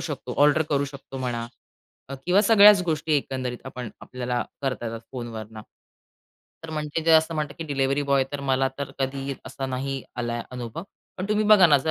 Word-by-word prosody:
शकतो 140 -6 -5
ऑर्डर 150 +2 +5
करू 140 0 +2
शकतो 135 -1 -9
म्हणा 120 -2 -3 0.8
किंवा 185 +3 +5
सगळ्याच 205 -2 +7
गोष्टी 155 -1 -1
एकंदरीत 130 -3 -3
आपण 125 -3 -6
आपल्याला 125 -1 -3 0.2
करता 130 -3 -2
येतात 115 0 -5
फोनवरनं. 110 -3 -7 1.0
तर 160 - -7
म्हणजे 150 +1 -3
जे 165 - +3
असं 160 +1 +4
म्हणतात 150 -2 -3
की 165 - -4
डिलिव्हरी 140 -1 0
बॉय 140 -1 +2
तर, 145 - -3
मला 135 -1 +1
तर 140 -1 -4
कधी 135 0 -2
असा 135 - -5
नाही 135 +1 -3
आलाय 120 -1 -2
अनुभव. 125 +5 -6 0.4
पण 185 - -2
तुम्ही 215 0 +2
बघा 210 -4 +8
ना, 145 -3 +5
जर 160 +4 -1
135 Hz, 175 wpm, -25 LUFS, 125-155 Hz, 1.0 s, बघा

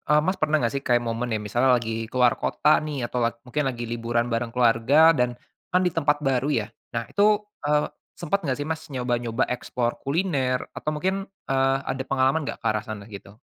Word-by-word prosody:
eee, 150 - +5
Mas, 185 +2 0
pernah 155 0 +2
gak 115 - -1
sih 140 - -2
kayak 120 -1 +2
momen 115 +1 -2
nih 110 -1 -1
misalnya 120 +5 +2
lagi 115 -1 -3
keluar 125 -2 +4
kota 150 - +3
nih 145 -5 -3
atau 120 -2 +1 0.2
mungkin 150 +4 -1
lagi 120 -2 -5
liburan 120 0 -1
bareng 115 0 -1
keluarga 125 +7 +5
dan 125 -1 0 0.4
kan 180 - +4
di 180 - +2
tempat 145 -2 +1
baru 135 +1 +1
ya. 110 -4 0 0.3
Nah 115 -1 -1
itu, 200 - +2 0.4
eee, 150 0 +2 0.3
sempat 195 +4 -1
gak 130 - +1
sih - - -1
mas 160 -1 -3
nyoba-nyoba 125 -2 -1
explore 120 -1 -2
kuliner 140 -5 0
atau - - -2
mungkin, 190 +5 -1 0.2
eee, 135 0 +3
ada 130 0 -2
pengalaman 135 +3 +1
gak - - -4
ke - - -15
arah 105 -1 -1
sana, 105 -3 -7
gitu? 100 0 -10
125 Hz, 200 wpm, -25 LUFS, 120-150 Hz, 0.4 s, eee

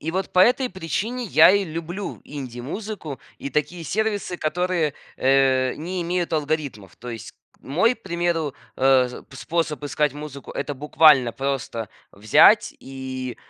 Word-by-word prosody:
И 160 - -3
вот 190 +1 -2
по - - +1
этой 250 +5 +4
причине 210 - -3
я 200 - +7
и 200 +1 +3
люблю 170 +4 -6
инди-музыку 145 - -6 0.2
и 140 - -6
такие 155 +3 -2
сервисы, 205 -1 -2
которые, 170 -2 0 0.2
э, 130 -1 +3
не 180 +4 -4
имеют 175 0 -2
алгоритмов. 145 - -3
То 120 +1 -8
есть, 115 -1 -8 0.2
к - - -32
мой, 185 - +2
примеру, 170 - -2 0.2
э, 130 -1 +3
п 135 - -13
способ 160 0 -2
искать 145 0 0
музыку- 145 -2 -8
это 145 - -3
буквально 145 -3 +4
просто 135 -5 -3 0.2
взять 110 - +5
и, 130 -1 -6
150 Hz, 140 wpm, -23 LUFS, 135-180 Hz, 0.2 s, я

